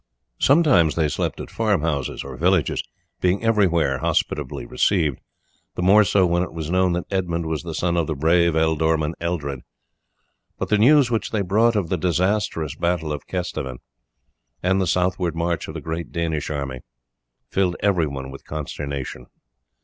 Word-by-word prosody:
Sometimes 135 - +4
they 80 -2 +2
slept 75 - -2
at - - -7
farm - - +1
houses 70 -5 -2
or 70 -1 -8
villages, 90 +2 +2 0.4
being 90 +4 +1
everywhere 85 -11 +2
hospitably 65 -1 -1
received, 75 0 +1 0.6
the 90 - -2
more 100 +4 +6
so 100 -2 +3
when 85 0 +1
it 90 - -3
was 80 -1 -4
known 95 -1 +2
that 90 0 -2
Edmund 85 -3 -1
was 80 -1 -2
the 85 -2 -6
son 85 +1 0
of 85 -3 +1
the 80 - -2
brave 85 +3 +3
ealdorman 80 0 +1
Eldred; 75 -6 -3 1.0
but - - -3
the 105 - +3
news 135 +2 +5
which 115 - 0
they 105 -3 -1
brought 110 +5 +3
of 95 -6 0
the 90 - 0
disastrous 90 -2 0
battle 85 -3 -1
of 75 - -7
Kesteven, 70 -8 -4 0.9
and 95 +2 +2
the 95 - 0
southward 90 -1 0
march 85 +1 -1
of 80 - -8
the 80 - -5
great 80 +3 -5
Danish 80 -3 -2
army, 70 -4 -4 0.7
filled 95 -2 +1
everyone 75 -9 0
with 70 - -11
consternation. 70 -4 -5
85 Hz, 165 wpm, -22 LUFS, 75-95 Hz, 1.0 s, more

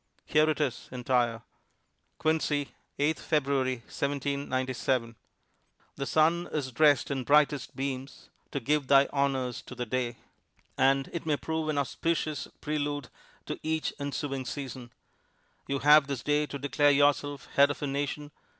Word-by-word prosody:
Here 155 +1 +3
it 155 - 0
is 145 -5 -2
entire: 120 -2 0 0.7
Quincy, 155 -2 0 0.2
8 150 +3 +1
February, 135 -3 +1
1797 130 -4 -1 0.8
"The 140 - -3
sun 165 +3 +2
is 140 -4 -2
dressed 145 +1 +4
in 135 -2 -1
brightest 145 -1 +3
beams, 135 0 -5 0.2
To 140 - -3
give 140 +2 0
thy 140 0 +6
honors 135 -3 0
to 125 - -11
the 125 0 -3
day." 120 0 -2 0.6
"And 135 0 +3 0.2
may 155 - 0
it - - -11
prove 160 -1 -2
an 150 - 0
auspicious 150 +2 -1
prelude 145 -2 -2 0.4
to - - -5
each 160 0 -1
ensuing 140 -1 -3
season. 130 -2 -6 0.8
You 140 - 0
have 150 +1 +6
this 140 -3 -4
day 150 0 +1
to 140 - -5
declare 145 +1 +2
yourself 145 0 +2
head 140 0 +6
of 145 - -4
a - - +1
Nation. 145 +1 -3
140 Hz, 140 wpm, -29 LUFS, 130-150 Hz, 0.8 s, thy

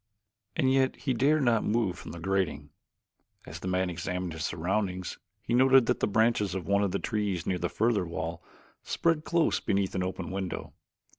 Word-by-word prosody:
And 130 0 +3
yet 130 -1 +2
he 135 - -1
dared 140 +5 +3
not 115 -3 +3
move 105 -4 +1
from - - -9
the 85 - -8
grating. 95 -5 -1 0.7
As - - -8
the - - -6
man 95 0 +1
examined 90 0 -3
his 80 -1 -5
surroundings 90 +2 -2 0.2
he - - -2
noted 130 0 +6
that - - +1
the - - +1
branches 105 -2 +2
of 95 - -3
one 100 0 +2
of 100 - +1
the - - -1
trees 105 -6 -2
near 90 -1 -1
the 85 - -1
further 110 -5 +1
wall 85 0 -4 0.4
spread 165 -2 0
close 170 -2 +2
beneath 95 -1 0
an 95 - -1
open 90 -1 -3
window. 95 -1 -4
95 Hz, 190 wpm, -29 LUFS, 90-120 Hz, 0.7 s, noted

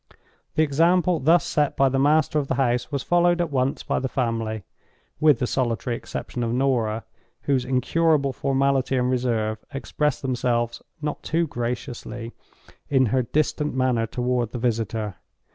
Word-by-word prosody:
The 155 - +4
example 170 +3 +3
thus 160 +4 +4
set 150 -2 0
by 135 - +5
the 135 0 +1
master 150 +2 +3
of 140 - -3
the - - 0
house 120 0 0
was 140 -2 -2
followed 175 0 +3
at 170 -3 -1
once 130 0 0
by - - 0
the 130 - -2
family—with 115 - -1
the 125 - -1
solitary 120 -2 -1
exception 120 +1 -5
of 115 -1 -1
Norah, 120 -4 0 0.4
whose 135 -3 +1
incurable 140 +2 +2
formality 135 0 +1
and 125 0 +1
reserve 115 -4 0
expressed 150 +1 -2
themselves, 120 -2 -1 0.2
not 150 -1 -3
too 165 +2 0
graciously, 120 -2 -5 0.6
in 135 -2 +4
her 130 - +3
distant 150 +3 -1
manner 125 -3 +1
toward 125 -1 -1
the - - -3
visitor. 115 -4 -2
130 Hz, 150 wpm, -24 LUFS, 120-145 Hz, 0.6 s, by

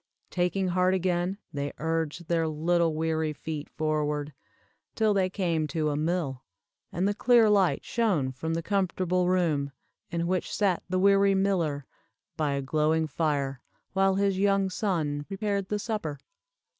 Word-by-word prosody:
Taking 185 +1 0
heart 185 +1 +2
again, 180 +1 0 0.2
they 145 0 -3
urged 165 +1 -2
their 165 -1 +1
little 165 +1 +1
weary 160 -1 0
feet 150 0 -6
forward, 150 -1 -1 0.6
till 220 -2 +3
they 190 -2 +2
came 170 -5 0
to 155 +1 -1
a - - -1
mill, 155 -4 -1 0.5
and 180 +4 0
the 205 - +1
clear 230 -1 +4
light 195 -4 +2
shone 190 - +1
from 160 +5 -3
the 165 - -2
comfortable 185 -2 0
room, 155 -6 +1 0.4
in 170 0 -1
which 185 +1 -1
sat 195 -4 +1
the 185 - 0
weary 195 +1 +4
miller, 170 -8 0 0.5
by 150 -3 0
a 140 0 -2
glowing 155 +3 +1
fire, 140 -3 -1 0.3
while 195 0 +3
his 195 -1 +1
young 195 -1 +2
son 155 -9 -1
prepared 200 0 -2
the 210 - 0
supper. 205 -9 -3
170 Hz, 150 wpm, -28 LUFS, 155-195 Hz, 0.6 s, clear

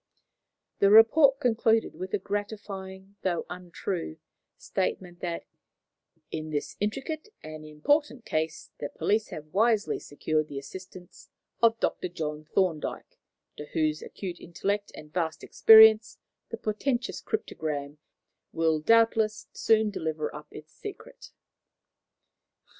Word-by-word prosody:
The 200 - +5
report 270 +6 +7
concluded 225 -3 +2
with 185 +1 -6
the 210 - 0
gratifying 200 -1 -6
though 175 -3 -1
untrue 180 - -5 0.4
statement 175 -2 -3
that 170 -1 -4 0.9
"in 155 -1 -4
this 150 -2 -3
intricate 270 - -3
and 155 0 -8
important 250 - 0
case, 155 0 -2
the 145 - -4
police 215 +1 0
have 155 0 -9
wisely 220 0 +2
secured 155 +1 -2
the 140 - -7
assistance 180 +5 -10 0.3
of 230 -1 +4
Dr. - - -1
John 155 -3 -5
Thorndyke, 165 -2 -2 0.4
to 150 - -7
whose 155 -1 +1
acute 180 -3 -7
intellect 200 +4 -3
and 150 0 -12
vast 160 -3 -2
experience 220 0 +7 0.3
the 230 - -5
portentous 240 +4 -2
cryptogram 150 - -4 0.5
will 160 -1 +1
doubtless 220 +3 +3
soon 220 -1 +3
deliver 160 -4 -3
up 150 +1 -9
its 155 0 -12
secret." - - -10
190 Hz, 115 wpm, -28 LUFS, 155-220 Hz, 0.9 s, report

